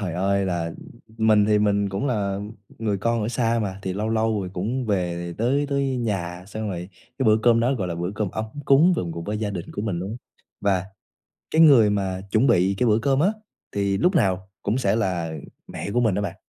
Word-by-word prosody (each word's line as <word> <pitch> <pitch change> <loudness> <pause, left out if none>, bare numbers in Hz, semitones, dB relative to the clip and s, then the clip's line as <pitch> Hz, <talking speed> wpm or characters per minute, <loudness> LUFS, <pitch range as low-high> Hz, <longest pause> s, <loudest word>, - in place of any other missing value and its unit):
Trời 90 -5 -3
ơi, 100 +2 +1
là, 85 -2 -1
ừm, 85 - -7 0.5
mình 105 -2 +5
thì 105 -1 +3
mình 100 -1 +2
cũng 100 +9 -2
là 100 -5 -1 0.4
người 105 -3 -1
con 115 +2 0
ở 105 - -1
xa 115 -1 +1
mà, 95 -1 -4
thì 95 - -2
lâu 105 +3 -2
lâu 110 -1 +1
rồi 95 -2 -5
cũng 115 +8 -2
về 85 -4 -2
tới 140 +5 +1
tới 140 -2 0
nhà, 90 -6 -3
xong 110 +1 -5
rồi 90 -1 -5 0.3
cái 135 - 0
bữa 110 0 +6
cơm 115 -1 +5
đó, 125 +3 +2
gọi 95 -7 -2
là, 85 - -3
bữa 85 +2 -3
cơm 105 -3 -2
ấm 110 - -3 0.2
cúng 155 +8 +5
cùng 85 - -2
cùng 85 0 -6
với 105 +1 -3
gia 105 -2 -2
đình 90 -4 -5
của 100 - -4
mình 100 -6 -2
luôn 95 +3 -4
á. 115 - -5 0.4
Và 95 -2 +1 0.7
cái 160 - +4
người 130 -9 +7
mà 95 -2 -1
chuẩn 115 +5 +3
bị 95 +2 +3
cái 125 - +2
bữa 110 0 +4
cơm 135 +2 +1
á 180 - +4 0.4
thì 100 -1 0
lúc 180 - +2
nào 95 - +1
cũng 105 +5 0
sẽ 130 - +1
là, 90 -7 -1
ừm, 80 - -6 0.3
mẹ 100 - -6
của 120 - +2
mình 110 -5 +2
đó 100 - 0
bạn. 100 -4 -4
105 Hz, 240 wpm, -24 LUFS, 95-115 Hz, 0.7 s, người